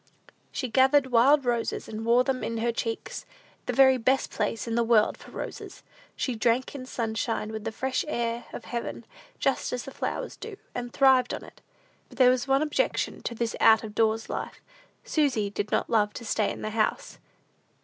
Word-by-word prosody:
She 260 Hz, -, -3 dB
gathered 265 Hz, +3 st, +4 dB
wild 270 Hz, +4 st, +5 dB
roses, 235 Hz, -1 st, -1 dB
and 220 Hz, 0 st, -6 dB
wore 235 Hz, +2 st, +4 dB
them 260 Hz, -1 st, -1 dB
in 230 Hz, -, -2 dB
her 235 Hz, +1 st, 0 dB
cheeks, 225 Hz, -1 st, -4 dB, 0.4 s
the -, -, +1 dB
very 265 Hz, -1 st, +6 dB
best 255 Hz, +3 st, +1 dB
place 230 Hz, -, -2 dB
in 230 Hz, -, -2 dB
the 235 Hz, 0 st, +2 dB
world 225 Hz, -2 st, +3 dB
for -, -, -15 dB
roses. -, -, -7 dB, 0.3 s
She 255 Hz, -, -1 dB
drank 235 Hz, +3 st, +1 dB
in 255 Hz, -3 st, -7 dB
sunshine 225 Hz, -2 st, -2 dB
with 220 Hz, 0 st, -6 dB
the 225 Hz, -, -2 dB
fresh 255 Hz, +3 st, -1 dB
air 235 Hz, -3 st, -2 dB
of -, -, -8 dB
heaven, 235 Hz, -1 st, -5 dB, 0.3 s
just 270 Hz, -2 st, 0 dB
as 250 Hz, -, -3 dB
the 270 Hz, -, -8 dB
flowers -, -, -4 dB
do, 445 Hz, -3 st, -8 dB, 0.2 s
and 245 Hz, 0 st, -5 dB
thrived 260 Hz, -2 st, +4 dB
on -, -, -8 dB
it. -, -, -15 dB, 0.5 s
But -, -, -15 dB
there 250 Hz, -1 st, +7 dB
was 255 Hz, +1 st, -1 dB
one 270 Hz, +2 st, +3 dB
objection 310 Hz, +12 st, -1 dB
to 235 Hz, -, -4 dB
this 230 Hz, 0 st, -2 dB
out 220 Hz, 0 st, +6 dB
of 215 Hz, -1 st, -7 dB
doors 220 Hz, 0 st, +1 dB
life: -, -, -5 dB, 0.4 s
Susy 250 Hz, -10 st, +1 dB
did 205 Hz, +1 st, -3 dB
not -, -, +1 dB
love 210 Hz, -2 st, +2 dB
to 235 Hz, -, -8 dB
stay 215 Hz, -1 st, +1 dB
in -, -, -7 dB
the 215 Hz, -, -3 dB
house. 225 Hz, -, -1 dB
240 Hz, 195 wpm, -27 LUFS, 225-265 Hz, 0.5 s, there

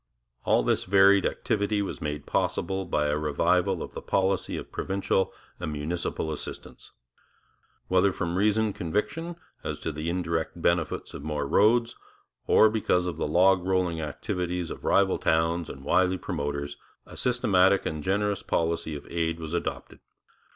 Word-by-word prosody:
All -, -, +3 dB
this -, -, +1 dB
varied 100 Hz, 0 st, +5 dB
activity 100 Hz, 0 st, -1 dB
was 100 Hz, -, -6 dB
made 75 Hz, -1 st, -4 dB
possible 95 Hz, +2 st, -1 dB
by 75 Hz, -4 st, 0 dB
a 75 Hz, 0 st, +1 dB
revival 85 Hz, +5 st, +1 dB
of -, -, -9 dB
the -, -, -6 dB
policy 95 Hz, -1 st, 0 dB
of -, -, -8 dB
provincial 95 Hz, 0 st, 0 dB, 0.3 s
and 75 Hz, -, -3 dB
municipal 80 Hz, +1 st, -3 dB
assistance. 75 Hz, -, -8 dB, 1.0 s
Whether 95 Hz, +1 st, +3 dB
from 85 Hz, -1 st, -3 dB
reasoned 105 Hz, +2 st, +2 dB
conviction 140 Hz, -, -2 dB, 0.3 s
as -, -, -3 dB
to 80 Hz, -, -2 dB
the 75 Hz, +2 st, -4 dB
indirect 85 Hz, -1 st, -2 dB
benefits 85 Hz, -1 st, 0 dB
of -, -, -7 dB
more 75 Hz, -2 st, -2 dB
roads, 115 Hz, +7 st, +3 dB, 0.5 s
or 110 Hz, -, +6 dB
because 105 Hz, -5 st, +1 dB
of 85 Hz, -3 st, -3 dB
the -, -, -1 dB
log 90 Hz, +3 st, +4 dB
rolling 90 Hz, -3 st, 0 dB
activities 90 Hz, +2 st, -3 dB
of -, -, -8 dB
rival 100 Hz, -1 st, +3 dB
towns 80 Hz, +1 st, +1 dB
and 65 Hz, -, -9 dB
wily 95 Hz, +4 st, +3 dB
promoters, 70 Hz, -3 st, -4 dB, 0.3 s
a -, -, -12 dB
systematic 100 Hz, -6 st, +3 dB
and 80 Hz, -1 st, -3 dB
generous 100 Hz, +3 st, 0 dB
policy 80 Hz, -2 st, -1 dB
of 70 Hz, -, -8 dB
aid 80 Hz, -1 st, -1 dB
was 80 Hz, 0 st, -6 dB
adopted. 85 Hz, -, -4 dB
90 Hz, 150 wpm, -27 LUFS, 80-100 Hz, 1.0 s, or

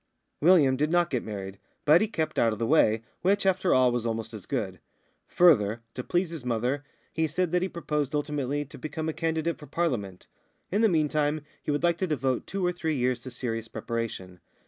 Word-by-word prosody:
William 150 Hz, -5 st, +5 dB
did 150 Hz, +3 st, 0 dB
not 175 Hz, 0 st, +2 dB
get 125 Hz, -3 st, -1 dB
married, 100 Hz, -2 st, -6 dB, 0.3 s
but 155 Hz, +4 st, +6 dB
he 215 Hz, -, +2 dB
kept 160 Hz, -7 st, -2 dB
out 115 Hz, -, +4 dB
of 110 Hz, -, -3 dB
the 115 Hz, -, -1 dB
way, 115 Hz, -6 st, +3 dB, 0.2 s
which, 200 Hz, +2 st, +2 dB
after 190 Hz, -1 st, +2 dB
all, 130 Hz, -1 st, +5 dB
was 120 Hz, -1 st, -1 dB
almost 115 Hz, -1 st, -3 dB
as 105 Hz, -3 st, -9 dB
good. -, -, -3 dB, 0.5 s
Further, 115 Hz, -, +4 dB
to 125 Hz, -, -5 dB
please 175 Hz, +3 st, 0 dB
his 160 Hz, -6 st, -6 dB
mother, 125 Hz, +4 st, -1 dB, 0.3 s
he 160 Hz, 0 st, +1 dB
said 165 Hz, +3 st, -1 dB
that 180 Hz, 0 st, +2 dB
he 190 Hz, -, -1 dB
proposed 150 Hz, -4 st, -2 dB
ultimately 145 Hz, -1 st, -1 dB
to 145 Hz, -, -12 dB
become 155 Hz, +1 st, -4 dB
a -, -, -2 dB
candidate 165 Hz, 0 st, -1 dB
for 150 Hz, -, -11 dB
Parliament. 110 Hz, -, -2 dB, 0.5 s
In 205 Hz, +4 st, +2 dB
the 225 Hz, -, +5 dB
meantime, 155 Hz, -2 st, +1 dB, 0.2 s
he -, -, -7 dB
would 145 Hz, +2 st, 0 dB
like 170 Hz, -1 st, +2 dB
to 185 Hz, -, 0 dB
devote 135 Hz, -5 st, -1 dB
two 195 Hz, -2 st, -2 dB
or 180 Hz, -, +2 dB
three 160 Hz, -3 st, -2 dB
years 125 Hz, -2 st, 0 dB
to 130 Hz, -, -7 dB
serious 115 Hz, -2 st, -4 dB
preparation. 110 Hz, -7 st, -5 dB
145 Hz, 210 wpm, -27 LUFS, 120-170 Hz, 0.5 s, but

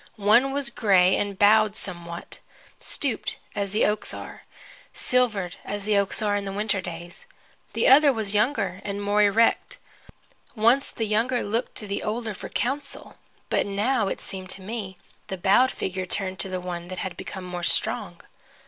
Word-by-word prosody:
One 225 Hz, +6 st, +4 dB
was 275 Hz, -3 st, 0 dB
gray 190 Hz, -5 st, +4 dB
and 200 Hz, -1 st, -2 dB
bowed 215 Hz, +1 st, +5 dB
somewhat, 170 Hz, -4 st, -2 dB, 0.4 s
stooped 260 Hz, -6 st, -2 dB, 0.2 s
as 200 Hz, -1 st, -2 dB
the 210 Hz, +3 st, +2 dB
oaks 210 Hz, 0 st, 0 dB
are, -, -, -10 dB, 0.5 s
silvered 215 Hz, -8 st, 0 dB
as 205 Hz, 0 st, -5 dB
the 210 Hz, -1 st, +2 dB
oaks 200 Hz, +1 st, +1 dB
are 205 Hz, -1 st, +1 dB
in 205 Hz, -, -1 dB
the 195 Hz, -, -4 dB
winter 205 Hz, 0 st, -1 dB
days. 175 Hz, 0 st, -8 dB, 0.5 s
The -, -, +2 dB
other 285 Hz, +2 st, +7 dB
was 220 Hz, -5 st, -3 dB
younger 205 Hz, -4 st, 0 dB
and 200 Hz, 0 st, -4 dB
more 205 Hz, +1 st, +2 dB
erect. 210 Hz, +3 st, +2 dB, 0.8 s
Once 235 Hz, +5 st, +3 dB
the 225 Hz, -, -3 dB
younger 230 Hz, +4 st, +1 dB
looked 225 Hz, +4 st, -2 dB
to 215 Hz, -, -5 dB
the 200 Hz, -, -3 dB
older 220 Hz, 0 st, -3 dB
for 195 Hz, -, -8 dB
counsel, 275 Hz, +4 st, -3 dB, 0.3 s
but -, -, +1 dB
now 210 Hz, +3 st, +1 dB
it -, -, -4 dB
seemed 190 Hz, -1 st, -8 dB
to 190 Hz, -, -3 dB
me 200 Hz, -3 st, -6 dB, 0.3 s
the 190 Hz, -, -4 dB
bowed 205 Hz, +8 st, +4 dB
figure 185 Hz, -4 st, -4 dB
turned 190 Hz, -1 st, 0 dB
to 190 Hz, -, -3 dB
the 185 Hz, 0 st, -3 dB
one 175 Hz, -1 st, -6 dB
that 185 Hz, 0 st, -7 dB
had 185 Hz, -3 st, -5 dB
become 190 Hz, +1 st, -7 dB
more 180 Hz, -1 st, -5 dB
strong. -, -, +1 dB
205 Hz, 175 wpm, -25 LUFS, 190-225 Hz, 0.8 s, other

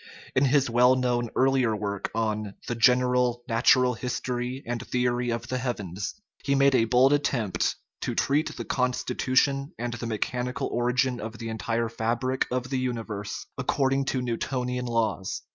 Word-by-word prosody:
In 130 Hz, -, +4 dB
his 140 Hz, +1 st, +3 dB
well 125 Hz, +2 st, +5 dB
known 120 Hz, -2 st, 0 dB
earlier 130 Hz, -4 st, +3 dB
work 100 Hz, -1 st, -3 dB
on 110 Hz, -2 st, -1 dB
The -, -, -1 dB
General 125 Hz, 0 st, +3 dB
Natural 125 Hz, +2 st, +4 dB
History 125 Hz, +2 st, -3 dB
and 120 Hz, -1 st, -3 dB
Theory 125 Hz, 0 st, 0 dB
of 120 Hz, 0 st, -3 dB
the 130 Hz, -, -1 dB
Heavens 100 Hz, -7 st, -4 dB, 0.3 s
he 140 Hz, -, +1 dB
made 140 Hz, 0 st, +4 dB
a 115 Hz, -3 st, +4 dB
bold 125 Hz, +4 st, +4 dB
attempt 115 Hz, -11 st, 0 dB
" -, -, -56 dB
to -, -, -2 dB
treat 150 Hz, +3 st, +1 dB
the -, -, -5 dB
consti 125 Hz, -1 st, -1 dB
tution 135 Hz, +2 st, +1 dB
and 120 Hz, +1 st, -3 dB
the 120 Hz, -1 st, -5 dB
mechanical 125 Hz, +3 st, -2 dB
origin 125 Hz, +1 st, +1 dB
of 110 Hz, +1 st, -6 dB
the 115 Hz, -1 st, -5 dB
entire 115 Hz, +1 st, -1 dB
fabric 115 Hz, +3 st, -1 dB
of 125 Hz, +1 st, -3 dB
the 130 Hz, -, 0 dB
universe 115 Hz, -5 st, -4 dB
according 135 Hz, -1 st, +1 dB
to 130 Hz, -2 st, -1 dB
Newtonian 125 Hz, +1 st, -2 dB
laws." 110 Hz, -5 st, -1 dB
125 Hz, 160 wpm, -27 LUFS, 115-130 Hz, 0.3 s, well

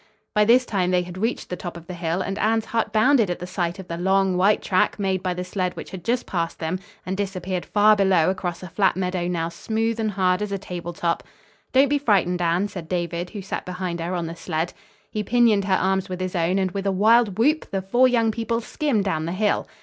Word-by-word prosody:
By 210 Hz, 0 st, +4 dB
this 250 Hz, +3 st, +5 dB
time 190 Hz, -6 st, 0 dB
they 180 Hz, -1 st, +2 dB
had 180 Hz, 0 st, -9 dB
reached 225 Hz, +4 st, -2 dB
the -, -, -1 dB
top 175 Hz, -1 st, -7 dB
of 170 Hz, -, -11 dB
the 180 Hz, -, -7 dB
hill, 170 Hz, +1 st, -2 dB
and 195 Hz, +1 st, -4 dB
Anne's 225 Hz, +1 st, +1 dB
heart 230 Hz, -1 st, -1 dB
bounded 225 Hz, -1 st, +4 dB
at 175 Hz, -, -1 dB
the 180 Hz, -, -6 dB
sight 175 Hz, -2 st, -2 dB
of 190 Hz, -2 st, -9 dB
the 170 Hz, -, -4 dB
long, 190 Hz, 0 st, +2 dB
white 195 Hz, +4 st, +3 dB
track 185 Hz, -2 st, +1 dB
made 190 Hz, -3 st, 0 dB
by 185 Hz, -1 st, -2 dB
the 180 Hz, -, -3 dB
sled 180 Hz, 0 st, -2 dB
which -, -, -8 dB
had 190 Hz, -3 st, -8 dB
just 240 Hz, +5 st, 0 dB
passed 170 Hz, -2 st, -2 dB
them 165 Hz, +3 st, -2 dB, 0.3 s
and 185 Hz, -, -2 dB
disappeared 190 Hz, -2 st, -3 dB
far 215 Hz, +1 st, +5 dB
below 190 Hz, -4 st, +3 dB
across 180 Hz, -2 st, -4 dB
a -, -, -6 dB
flat 190 Hz, +3 st, +2 dB
meadow 180 Hz, -1 st, -1 dB
now 170 Hz, -2 st, -1 dB
smooth 225 Hz, +6 st, -2 dB
and 220 Hz, -1 st, 0 dB
hard 185 Hz, 0 st, +2 dB
as 210 Hz, -1 st, -3 dB
a 200 Hz, -, -1 dB
table 175 Hz, -3 st, -6 dB
top. 170 Hz, 0 st, -1 dB, 0.5 s
"Don't 270 Hz, +2 st, +5 dB
be 290 Hz, +1 st, +1 dB
frightened, 190 Hz, -8 st, +2 dB
Anne," 175 Hz, +4 st, +1 dB
said 180 Hz, -5 st, -8 dB
David, 175 Hz, 0 st, -2 dB
who 205 Hz, -1 st, -7 dB
sat 190 Hz, -, -4 dB
behind 180 Hz, -1 st, -4 dB
her 170 Hz, +2 st, -2 dB
on 170 Hz, -1 st, -2 dB
the 165 Hz, +1 st, -6 dB
sled. 165 Hz, 0 st, -3 dB, 0.4 s
He 215 Hz, -, -2 dB
pinioned 225 Hz, -3 st, +3 dB
her 190 Hz, -1 st, +3 dB
arms 190 Hz, 0 st, 0 dB
with 185 Hz, 0 st, -4 dB
his 185 Hz, 0 st, -3 dB
own 175 Hz, +2 st, +1 dB
and 190 Hz, -1 st, 0 dB
with 195 Hz, +1 st, -3 dB
a -, -, +3 dB
wild 215 Hz, +1 st, +4 dB
whoop 300 Hz, +7 st, +2 dB
the 195 Hz, -1 st, -2 dB
four 240 Hz, +7 st, +4 dB
young 230 Hz, -3 st, +2 dB
people 230 Hz, +1 st, -1 dB
skimmed 235 Hz, -2 st, -1 dB
down 160 Hz, -4 st, -1 dB
the 170 Hz, -, -2 dB
hill. 205 Hz, +2 st, 0 dB
190 Hz, 245 wpm, -23 LUFS, 180-215 Hz, 0.5 s, this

